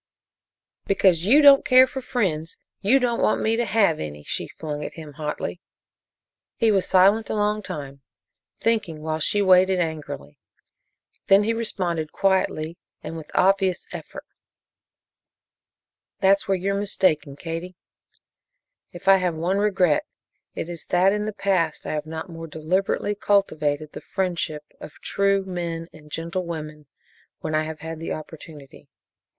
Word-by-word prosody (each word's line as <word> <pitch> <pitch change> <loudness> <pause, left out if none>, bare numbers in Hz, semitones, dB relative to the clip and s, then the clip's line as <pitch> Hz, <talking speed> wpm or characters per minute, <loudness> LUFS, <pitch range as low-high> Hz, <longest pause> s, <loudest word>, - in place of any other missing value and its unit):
"Because 185 -3 +3
you 290 +7 +6
don't 280 -1 +8
care 255 0 +7
for 265 +1 -6
friends, 180 -11 -2 0.2
you 220 +7 +4
don't 245 -3 0
want - - +2
me 220 +1 +1
to 240 +1 0
have 200 -7 +2
any!" 75 -1 -6
she - - -3
flung 150 -2 -6
at - - -6
him 155 -3 -10
hotly. 150 +4 -4 1.0
He 225 -2 +3
was 195 -3 +1
silent 200 +4 +4
a - - -1
long 210 0 0
time, 140 -7 -7 0.6
thinking, 195 -9 -1
while 155 0 -2
she 205 +6 +2
waited 185 0 +5
angrily, 150 - -5 0.9
then 195 +1 +6
he 225 +2 +1
responded 175 -8 -2
quietly 180 -4 0 0.2
and 165 - -6
with 160 -2 -9
obvious 190 -1 +2
effort: - - -8 1.9
"That's 195 0 +3
where 195 -1 +2
you're 195 +2 -1
mistaken, 185 -8 0
Katie. 165 +4 -6 1.2
If 175 - -11
I 195 0 +8
have 180 -3 -1
one 175 +5 0
regret 190 -7 +2 0.5
it - - -4
is 170 -2 -8
that 185 +2 +3
in 210 0 -1
the 215 - -2
past 190 -6 0
I - - -3
have 150 0 -3
not 160 +2 -6
more 165 -2 -8
deliberately 180 +6 -1
cultivated 155 -8 0
the - - -9
friendship 175 -5 -2 0.2
of 155 - -10
true 200 -1 +1
men 170 -3 -4
and 150 -1 -15
gentle 170 +4 -3
women 155 -3 -7 0.5
when 155 - -3
I 155 0 +1
have 155 0 -7
had 160 0 -6
the 165 - -4
opportunity. 155 -2 -11
180 Hz, 150 wpm, -24 LUFS, 155-200 Hz, 1.9 s, don't